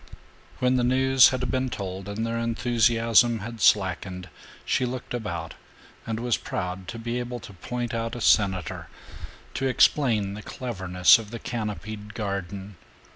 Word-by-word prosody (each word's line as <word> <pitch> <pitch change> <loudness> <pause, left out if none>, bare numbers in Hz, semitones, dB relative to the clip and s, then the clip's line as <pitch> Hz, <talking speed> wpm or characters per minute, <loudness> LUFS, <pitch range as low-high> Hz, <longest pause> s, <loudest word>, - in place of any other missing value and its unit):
When 125 0 +2
the 125 - +1
news 130 +1 +5
had 125 -1 -2
been 130 0 0
told 95 -2 -5
and 110 +3 -3
their 115 0 -2
enthusiasm 115 0 +3
had 115 +1 -7
slackened 95 -2 +2 0.4
she - - +1
looked 125 0 -4
about 85 -9 -4 0.5
and 110 0 -2
was 120 -1 +1
proud 90 0 -5
to 115 - -6
be 120 +2 -3
able 120 0 -5
to 100 - -11
point 120 +5 -4
out 115 0 -2
a 120 - -6
senator, 95 -7 +2 0.7
to 135 - -1
explain 115 -6 +3
the 105 - -7
cleverness 95 -8 +3
of 110 -2 -9
the 115 - -6
canopied 105 -2 -5
garden. 100 -2 -5
115 Hz, 150 wpm, -26 LUFS, 100-120 Hz, 0.7 s, news